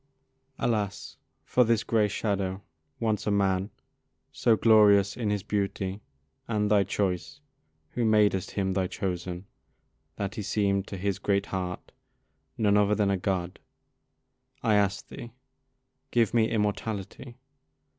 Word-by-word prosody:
Alas! 105 -4 -2 0.3
for 125 - +3
this 115 -1 +2
gray 110 -2 +2
shadow, 100 -2 -2 0.4
once 110 -2 -1
a - - +3
man 100 -1 +1 0.6
So 115 - +3
glorious 105 -3 +5
in 115 -3 -2
his 105 -2 -1
beauty 100 -1 -2 0.5
and 105 -2 0
thy 100 -2 +5
choice, 95 +6 -2 0.5
Who 120 - -2
madest 105 -4 +3
him 95 -2 -1
thy 95 -1 0
chosen, 90 0 -4 0.7
that 100 0 -3
he 110 - -5
seem'd 100 -1 0
To 100 - -6
his 100 +1 -2
great 100 -1 +1
heart 90 -1 -5 0.7
none 105 -2 +3
other 105 0 +3
than 105 -2 +1
a - - +2
God! 90 -1 -2 1.0
I 110 - +3
ask'd 100 -1 +1
thee, 120 -1 -9 0.8
'Give 115 -3 +2
me 115 -2 +3
immortality.' 105 +3 -3
100 Hz, 130 wpm, -27 LUFS, 95-110 Hz, 1.0 s, glorious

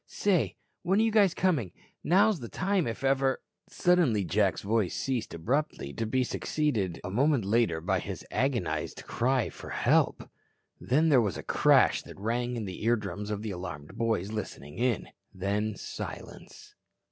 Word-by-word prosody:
Say, 195 -5 +1 0.3
when 190 +4 +2
are - - +4
you 215 -3 +4
coming? 145 - +1 0.3
Now's 200 +2 +4
the 120 -3 -7
time 190 -4 0
if 115 +3 -5
ever 135 0 +2 0.2
" - - -59
Suddenly, 170 - +3
Jack's 95 +2 +1
voice 105 -2 0
ceased 130 -9 -2
abruptly, 120 - -2
to 115 - -3
be 130 +3 +1
succeeded 115 - -1
a 90 - -5
moment 135 +1 +2
later 100 -6 +2
by 80 - 0
his - - -6
agonized 90 - -1
cry 125 0 0
for - - -10
"Help." - - +2 0.5
Then 155 +6 +2
there 135 -5 +6
was 100 -6 -1
a - - -6
crash - - +4
that - - -12
rang 120 +4 -1
in 115 -3 -3
the 95 +1 -7
eardrums 105 -3 -1
of 105 0 -3
the 110 - -3
alarmed 90 -6 -7
boys 110 -4 -1
listening 85 -7 -6
in. 120 -2 0 0.3
Then, 100 +3 -1
silence. - - -8
115 Hz, 160 wpm, -29 LUFS, 100-140 Hz, 0.5 s, there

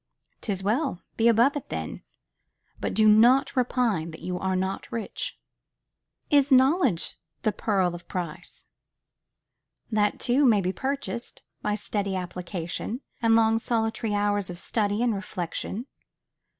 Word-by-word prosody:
'Tis 195 -3 -2
well: 225 - 0
be 230 - +3
above 235 +5 +5
it 290 - -5
then; 80 -1 -5 0.8
only - - 0
do 215 +1 +4
not 240 +7 +5
repine 240 -9 +1
that 160 - -10
you 180 - -3
are 190 0 0
not 190 +1 -3
rich. 230 -2 -4 0.9
Is 285 -1 +4
knowledge 260 - +3 0.2
the 215 - +3
pearl 190 -5 0
of 175 0 -9
price? 175 -4 -6 1.3
That 210 -1 +1
too 260 +4 +2
may 230 -6 +5
be 185 -1 -1
purchased 265 -2 -4 0.2
by 210 0 0
steady 200 -2 -2
application, 180 - -4 0.2
and 225 -1 +4
long 225 0 +4
solitary 225 -2 -1
hours 205 -2 0
of 175 - -6
study 210 +3 0
and 240 -2 +2
reflection. 200 +2 -4
215 Hz, 135 wpm, -26 LUFS, 190-240 Hz, 1.3 s, above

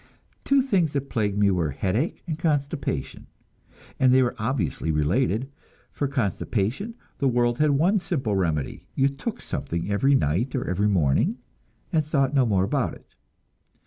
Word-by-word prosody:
Two 275 -1 +3
things 185 - +1
that 140 -1 -3
plagued 105 -4 0
me 100 -1 +4
were 85 -4 0
headache 95 - -2
and 160 -3 -4
constipation, 145 - -2 0.7
and 130 -1 +5
they 130 0 +5
were 125 - 0
obviously 110 - -1
related. 100 - +1 0.4
For 145 - -2
constipation, 130 - -2 0.2
the 140 - +2
world 120 -1 +1
had 150 0 +4
one 170 +9 +3
simple 135 - -1
remedy; 80 -7 -2
you 135 - +3
"took 175 - -5
something" 85 +4 -3
every 135 +7 +3
night 105 - 0
or 130 - -2
every 95 +4 +1
morning, 75 -9 +2 0.6
and 155 -2 +3
thought 140 -2 +1
no 135 -4 +3
more 95 -4 +2
about 95 - -1
it. - - -20
125 Hz, 155 wpm, -25 LUFS, 95-145 Hz, 0.7 s, and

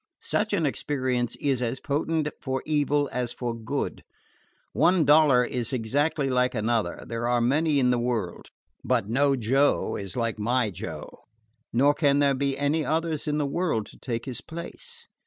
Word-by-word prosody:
Such 215 +1 0
an 180 -6 +1
experience 130 -4 -1
is 135 -3 -1
as 125 +2 -2
potent 155 +1 -1
for 130 -1 -2
evil 145 -1 +1
as 125 -1 -2
for 120 -1 -3
good. 115 +5 -4 0.7
One 175 -3 +3
dollar 145 -4 +6
is 120 0 -2
exactly 140 +5 0
like 125 -1 +1
another 110 -4 -1
there 115 0 -3
are 120 0 +2
many 145 +5 +2
in 125 -1 +3
the 125 - +1
world: 115 -7 -3 0.3
but - - +1
no 135 +5 +2
Joe 135 +4 +2
is 100 +3 -7
like 115 -2 -1
my 120 0 +1
Joe, 90 - -8 0.5
nor 140 +5 +4
can 145 -2 +2
there 140 -1 +3
be 135 0 -1
any 145 +3 +1
others 160 0 -1
in 150 0 0
the 150 - 0
world 140 - -1
to - - -17
take 115 -3 -4
his 130 -3 -5
place. 470 - -8
135 Hz, 170 wpm, -26 LUFS, 120-150 Hz, 0.7 s, dollar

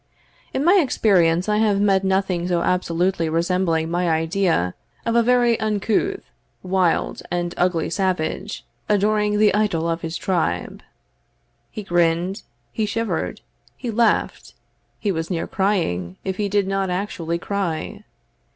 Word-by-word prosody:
In 275 - -1
my 375 +3 +6
experience 180 - +2
I 210 0 +2
have 210 -2 +2
met 195 -1 +3
nothing 190 -2 0
so 175 -1 +1
absolutely 180 -1 0
resembling 165 -1 0
my 175 0 +1
idea 165 - +1 0.3
of 230 - 0
a 235 - +6
very 240 -1 +3
uncouth, 220 - 0 0.4
wild, 185 -2 0
and 175 0 -2
ugly 175 -3 +1
savage, 185 +2 -2 0.2
adoring 210 0 +2
the 210 -1 +4
idol 200 -6 +1
of 165 0 -1
his 165 +1 -4
tribe. 160 - -1 0.9
He 215 - -7
grinned, 175 +2 +1 0.3
he 215 -1 -1
shivered, 225 +2 -2 0.4
he 240 - -4
laughed, 225 0 0 0.4
he 205 - -1
was 165 -2 -3
near 170 -3 -2
crying, 165 - -1
if 190 -1 -3
he 205 -1 -1
did 200 -1 +1
not 195 -1 -1
actually 180 -3 -2
cry. 175 -4 -3
190 Hz, 135 wpm, -22 LUFS, 170-210 Hz, 0.9 s, my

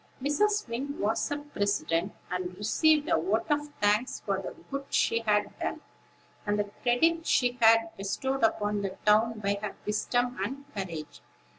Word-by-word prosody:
Mrs. 415 +10 +1
Wing 265 +5 -4
was 215 +6 0 0.2
president, 200 -3 0 0.2
and 180 0 -3
received 300 - +3
a 335 - +2
vote 370 - 0
of 295 0 0
thanks 210 +4 +2
for 195 -1 -1
the - - -7 0.2
good 275 0 -4
she 230 - +2
had 210 -2 +1
done, - - -2 0.6
and 205 0 0
the 205 -1 -2
credit 325 +7 +2
she 245 0 +2
had 225 0 +5
bestowed 265 +7 -2
upon 210 -2 +1
the 195 -1 -4
town 215 +1 +3
by 200 0 0
her 210 -2 -4
wisdom 245 +4 0
and 270 +7 -5
courage. 170 -7 -6
225 Hz, 155 wpm, -29 LUFS, 205-270 Hz, 0.6 s, had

